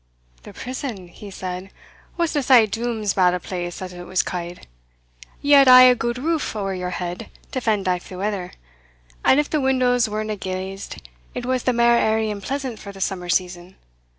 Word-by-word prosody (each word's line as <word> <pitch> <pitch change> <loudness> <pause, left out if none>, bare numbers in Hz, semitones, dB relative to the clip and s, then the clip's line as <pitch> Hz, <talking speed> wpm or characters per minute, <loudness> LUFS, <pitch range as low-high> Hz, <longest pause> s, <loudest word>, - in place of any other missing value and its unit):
"The - - -12
prison," 245 -8 -6
he 205 +3 -11
said, 185 0 -6 0.5
"wasna 330 -4 0
sae 250 -4 +6
dooms 220 -1 -2
bad 180 -2 +3
a - - -3
place 175 0 -5
as 180 -1 -7
it 175 0 -9
was 185 - +1
ca'd. 175 -1 -6 0.8
Ye 285 - 0
had 275 -1 +8
aye 255 0 +10
a 255 0 +8
good 240 0 -2
roof 315 -1 -1
ower 195 -2 -2
your 180 -1 -3
head 180 0 -5 0.2
to 260 - -2
fend 210 -5 0
aff 180 -1 -1
the 185 - -8
weather, 195 -2 -3 0.7
and, 265 - +5
if 295 - +1
the 305 - 0
windows 250 -3 +2
werena 215 0 -3
glazed, 190 - -6 0.3
it 245 - -4
was 255 0 0
the 255 - +3
mair 235 0 +4
airy 220 0 +1
and 205 -1 -6
pleasant 260 +1 -4
for 200 - -9
the 195 - -13
summer 185 -2 -3
season. 180 +1 -1
210 Hz, 190 wpm, -22 LUFS, 185-250 Hz, 0.8 s, aye